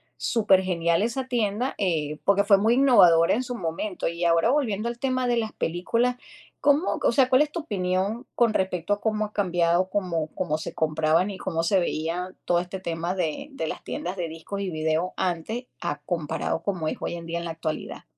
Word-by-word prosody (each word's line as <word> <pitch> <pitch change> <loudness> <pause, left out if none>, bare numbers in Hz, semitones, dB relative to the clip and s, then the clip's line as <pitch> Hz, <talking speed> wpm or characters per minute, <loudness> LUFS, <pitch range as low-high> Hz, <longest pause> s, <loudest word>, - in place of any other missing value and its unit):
supergenial 185 -5 +2
esa 245 +4 -1
tienda, 240 0 -1
eh, 155 -6 -1
porque 200 0 +3
fue 200 -1 +6
muy 220 +4 +3
innovadora, 180 -12 +6
en 250 - -1
su 245 - -5
momento. 180 +1 -3
Y 170 +1 -3
ahora, 170 +5 +4
volviendo 235 -6 0
al 235 - -5
tema 255 -1 0
de 240 - +2
las 220 -1 -1
películas, 230 +9 0 0.5
¿cómo 290 +4 +2
o - - +4
sea, 265 -3 +4
cuál 255 +2 +5
es 300 - -6
tu 340 - -3
opinión 195 -1 -2
con 235 -2 +3
respecto 185 0 0
a 205 - -4
cómo 215 -1 0
ha 210 - -10
cambiado, 175 -1 +1
cómo 170 -6 -1
cómo 155 -4 -1
se 160 - -6
compraban 160 +4 +1
y 195 - -7
cómo 165 -3 -2
se 190 +3 +3
veía 175 +3 -2
todo 175 -1 +3
este 180 +1 -6
tema 170 0 -3
de 180 - -2
de 160 -12 -4
las - - -5
tiendas 180 +2 -4
de 170 -3 -2
discos 165 +5 -6
y 190 - -2
videos 160 +2 0
antes 190 +8 -2 0.2
a 145 - -2
comparado 160 0 -2
como 180 -6 -2
es - - -1
hoy - - -3
en 170 -1 -8
día, 170 +1 -3
en 170 - -6
la 165 - -3
actualidad? 160 -1 -5
185 Hz, 205 wpm, -25 LUFS, 165-220 Hz, 0.5 s, fue